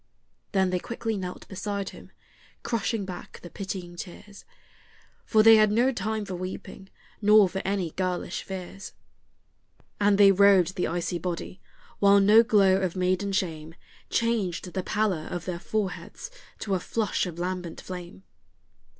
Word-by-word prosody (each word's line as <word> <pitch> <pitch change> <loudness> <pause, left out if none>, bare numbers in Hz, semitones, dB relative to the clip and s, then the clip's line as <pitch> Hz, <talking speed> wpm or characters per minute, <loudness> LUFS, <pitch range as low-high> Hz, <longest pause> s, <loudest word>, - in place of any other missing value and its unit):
Then 190 -2 +2
they 180 - 0
quickly 230 +1 -4
knelt 180 -2 -6
beside 200 0 -4
him, - - -14 0.5
crushing 225 -2 -1
back 180 -2 -9
the 175 - -10
pitying 185 -3 -6
tears, 200 +3 -10 0.8
For 215 -1 +4
they 225 0 +9
had 215 -1 +4
no 240 +5 +3
time 215 -2 -3
for 195 - -6
weeping, 185 +1 -7 0.3
nor 210 -1 +6
for 190 +1 -4
any 190 -4 -1
girlish 185 0 -3
fears. 190 +1 -8 1.1
And 205 -1 +3
they 200 -1 +7
robed 195 -2 +5
the 180 - 0
icy 175 +1 -2
body, 180 +2 -5 0.4
while 200 0 +6
no 210 +3 +7
glow 200 -4 +4
of 185 -2 -1
maiden 185 +2 0
shame 165 -5 -3 0.3
Changed 200 -7 -1
the 190 - -1
pallor 190 -5 -1
of 175 - -5
their 180 -2 -4
foreheads 215 - -4 0.3
to 200 - -2
a 185 - +1
flush 210 +1 -1
of 170 -2 -7
lambent 180 -1 -4
flame. 180 0 -9
190 Hz, 150 wpm, -26 LUFS, 180-205 Hz, 1.1 s, they